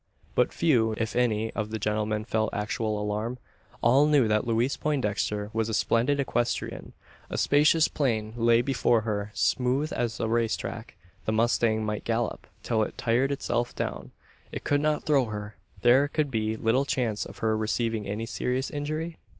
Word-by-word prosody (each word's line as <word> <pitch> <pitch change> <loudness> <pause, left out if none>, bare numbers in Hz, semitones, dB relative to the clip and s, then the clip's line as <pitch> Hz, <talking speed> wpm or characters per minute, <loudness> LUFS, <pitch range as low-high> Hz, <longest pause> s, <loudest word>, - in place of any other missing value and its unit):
But - - +2
few, 120 -9 +2
if 115 -1 -2
any, 110 -3 +1
of 110 -1 -3
the 110 - -3
gentlemen 105 0 -1
felt 110 -1 -1
actual 105 0 -1
alarm. 105 +4 -2 0.5
All 135 +5 +5
knew 145 -6 +4
that 105 +2 +1
Louise 115 +4 +1
Poindexter 105 -7 -1
was 115 0 0
a 110 - 0
splendid 125 +6 +2
equestrian; 120 -3 -2 0.4
a - - -3
spacious 150 +3 +4
plain 110 -6 -1
lay 115 0 +3
before 120 -3 +2
her, 105 -2 -2
smooth 130 +4 +1
as 120 -2 -2
a - - 0
race 115 0 +1
track; - - -7 0.3
the - - 0
mustang 110 -1 +2
might 105 0 -3
gallop 115 0 -2 0.2
till 110 -2 +1
it 110 - -3
tired 125 +4 +1
itself 120 -3 -1
down; - - -4 0.4
it - - -6
could 145 0 +1
not 150 0 +1
throw 140 -4 +3
her; 105 -1 -6 0.3
there 130 +4 +5
could 145 -1 -1
be 110 -2 -1
little 115 +5 +2
chance 120 -6 -1
of - - -10
her 110 0 +2
receiving 110 -1 -1
any 105 +3 -3
serious 125 +3 -2
injury? 155 +3 -4
115 Hz, 170 wpm, -27 LUFS, 110-135 Hz, 0.5 s, All